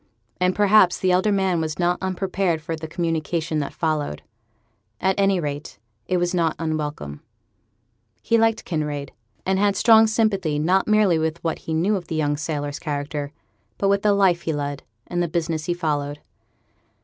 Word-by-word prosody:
And, 180 Hz, 0 st, +2 dB
perhaps, 205 Hz, -3 st, +5 dB
the 185 Hz, -, +1 dB
elder 185 Hz, +4 st, +3 dB
man 190 Hz, -4 st, +1 dB
was 155 Hz, -1 st, -3 dB
not 175 Hz, 0 st, +1 dB
unprepared 185 Hz, -2 st, -1 dB
for 165 Hz, +1 st, -4 dB
the 160 Hz, 0 st, -7 dB
communication 165 Hz, -1 st, -1 dB
that 140 Hz, -, -3 dB
followed. 150 Hz, -, -2 dB, 0.8 s
At 190 Hz, -, +2 dB
any 195 Hz, -1 st, +3 dB
rate, 145 Hz, -5 st, -5 dB, 0.3 s
it 185 Hz, -, +1 dB
was 175 Hz, 0 st, 0 dB
not 165 Hz, -3 st, +1 dB
unwelcome. 150 Hz, -, -4 dB, 1.0 s
He 230 Hz, -, +3 dB
liked 225 Hz, 0 st, +2 dB
Kinraid, 150 Hz, -4 st, -3 dB, 0.3 s
and 190 Hz, 0 st, +1 dB
had 200 Hz, -1 st, +2 dB
strong 225 Hz, +1 st, +6 dB
sympathy 200 Hz, -8 st, +1 dB
not 180 Hz, +6 st, +2 dB
merely 210 Hz, -6 st, +4 dB
with 160 Hz, +1 st, -1 dB
what 165 Hz, -1 st, -1 dB
he 160 Hz, -, -5 dB
knew 190 Hz, +7 st, +2 dB
of 175 Hz, -3 st, -8 dB
the 160 Hz, -, -4 dB
young 145 Hz, -2 st, +1 dB
sailor's 145 Hz, -1 st, -3 dB
character, 145 Hz, -1 st, -4 dB, 0.5 s
but 195 Hz, -, +1 dB
with 200 Hz, 0 st, +2 dB
the 210 Hz, -1 st, +3 dB
life 185 Hz, -4 st, +3 dB
he 160 Hz, -, -2 dB
led, 145 Hz, -1 st, -3 dB, 0.2 s
and 175 Hz, 0 st, -2 dB
the 175 Hz, -, +1 dB
business 160 Hz, -1 st, -2 dB
he 175 Hz, -, 0 dB
followed. 145 Hz, -4 st, -2 dB
170 Hz, 175 wpm, -23 LUFS, 155-190 Hz, 1.0 s, strong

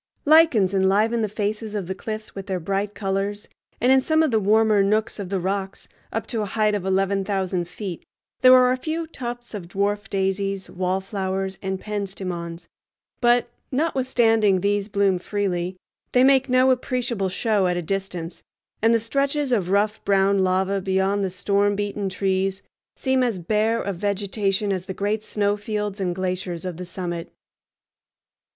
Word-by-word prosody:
Lichens 290 Hz, -, +5 dB
enliven 205 Hz, +4 st, +2 dB
the 215 Hz, -, 0 dB
faces 210 Hz, +1 st, -3 dB
of 200 Hz, -3 st, -2 dB
the 190 Hz, -, -3 dB
cliffs 215 Hz, +2 st, -6 dB
with 195 Hz, 0 st, -7 dB
their 190 Hz, -2 st, -1 dB
bright 200 Hz, +4 st, -2 dB
colors, 200 Hz, +1 st, -2 dB, 0.3 s
and 250 Hz, +3 st, +3 dB
in 265 Hz, 0 st, +6 dB
some 315 Hz, +4 st, +2 dB
of 310 Hz, -, +1 dB
the 220 Hz, -, +3 dB
warmer 215 Hz, 0 st, +4 dB
nooks 215 Hz, +2 st, +1 dB
of 195 Hz, -3 st, -5 dB
the 195 Hz, -1 st, -1 dB
rocks, 195 Hz, +1 st, -3 dB, 0.2 s
up -, -, -2 dB
to 230 Hz, -3 st, -2 dB
a 210 Hz, -, -2 dB
height 215 Hz, +1 st, +1 dB
of 205 Hz, -3 st, -1 dB
eleven 195 Hz, +1 st, +1 dB
thousand 190 Hz, -3 st, -1 dB
feet, 180 Hz, -1 st, -6 dB, 0.4 s
there 255 Hz, 0 st, +9 dB
are 250 Hz, 0 st, +5 dB
a 255 Hz, -, +1 dB
few 320 Hz, +5 st, -3 dB
tufts 240 Hz, -6 st, -7 dB
of 195 Hz, -5 st, -6 dB
dwarf 205 Hz, +3 st, -1 dB
daisies, 195 Hz, 0 st, -1 dB
wallflowers, 190 Hz, +1 st, -2 dB
and 190 Hz, -1 st, -3 dB
penstemons; 185 Hz, -5 st, -5 dB, 0.5 s
but, 240 Hz, 0 st, +3 dB, 0.2 s
notwithstanding 235 Hz, -, +2 dB
these 205 Hz, 0 st, +1 dB
bloom 200 Hz, -3 st, +1 dB
freely, 185 Hz, -2 st, -2 dB, 0.4 s
they 250 Hz, -, +5 dB
make 270 Hz, 0 st, +4 dB
no 255 Hz, +1 st, +5 dB
appreciable 245 Hz, -6 st, -1 dB
show 200 Hz, 0 st, +1 dB
at 180 Hz, 0 st, 0 dB
a -, -, -1 dB
distance, 180 Hz, -2 st, -4 dB, 0.4 s
and 225 Hz, +1 st, +4 dB
the -, -, +3 dB
stretches 275 Hz, +4 st, -1 dB
of 195 Hz, -7 st, +1 dB
rough 210 Hz, +2 st, +1 dB
brown 195 Hz, 0 st, +3 dB
lava 190 Hz, +1 st, +1 dB
beyond 190 Hz, +1 st, +1 dB
the 190 Hz, -, 0 dB
storm 200 Hz, +2 st, +1 dB
beaten 205 Hz, -1 st, -2 dB
trees 190 Hz, 0 st, -1 dB, 0.3 s
seem 260 Hz, -1 st, +1 dB
as 240 Hz, -5 st, +1 dB
bare 215 Hz, +6 st, +1 dB
of 200 Hz, -5 st, -3 dB
vegetation 200 Hz, 0 st, 0 dB
as 185 Hz, -1 st, -4 dB
the 190 Hz, -, -5 dB
great 205 Hz, +2 st, -1 dB
snow 205 Hz, -1 st, 0 dB
fields 210 Hz, -1 st, -3 dB
and 180 Hz, -2 st, -1 dB
glaciers 185 Hz, -2 st, -3 dB
of 180 Hz, -3 st, -4 dB
the 180 Hz, -, -6 dB
summit. 175 Hz, -1 st, -5 dB
200 Hz, 170 wpm, -23 LUFS, 190-220 Hz, 0.5 s, there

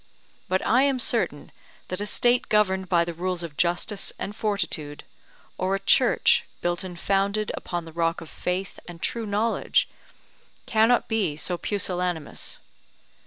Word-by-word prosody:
But 185 Hz, +1 st, +1 dB
I 250 Hz, +4 st, +4 dB
am 275 Hz, -1 st, +3 dB
certain 250 Hz, -, 0 dB, 0.4 s
that 185 Hz, +2 st, -3 dB
a 205 Hz, -, -2 dB
State 240 Hz, +3 st, +2 dB
governed 190 Hz, -3 st, +2 dB
by 170 Hz, -2 st, +4 dB
the 170 Hz, -, -4 dB
rules 180 Hz, +1 st, -2 dB
of 160 Hz, -3 st, -7 dB
justice 175 Hz, +5 st, 0 dB
and 205 Hz, -, -5 dB
fortitude, 170 Hz, -9 st, -2 dB, 0.6 s
or 190 Hz, +1 st, +1 dB
a -, -, -2 dB
Church -, -, +4 dB, 0.2 s
built 175 Hz, +1 st, -1 dB
and 180 Hz, -2 st, -7 dB
founded 200 Hz, +3 st, +1 dB
upon 175 Hz, -2 st, -4 dB
the 165 Hz, -, -11 dB
rock 165 Hz, 0 st, 0 dB
of 165 Hz, -, -10 dB
faith 185 Hz, +4 st, -3 dB
and 175 Hz, -1 st, -9 dB
true 230 Hz, +5 st, -2 dB
knowledge, 215 Hz, +3 st, +1 dB, 0.8 s
cannot 225 Hz, +1 st, +3 dB
be 205 Hz, -9 st, 0 dB
so 175 Hz, +4 st, -1 dB
pusillanimous. 180 Hz, -4 st, -2 dB
185 Hz, 150 wpm, -25 LUFS, 175-210 Hz, 0.8 s, I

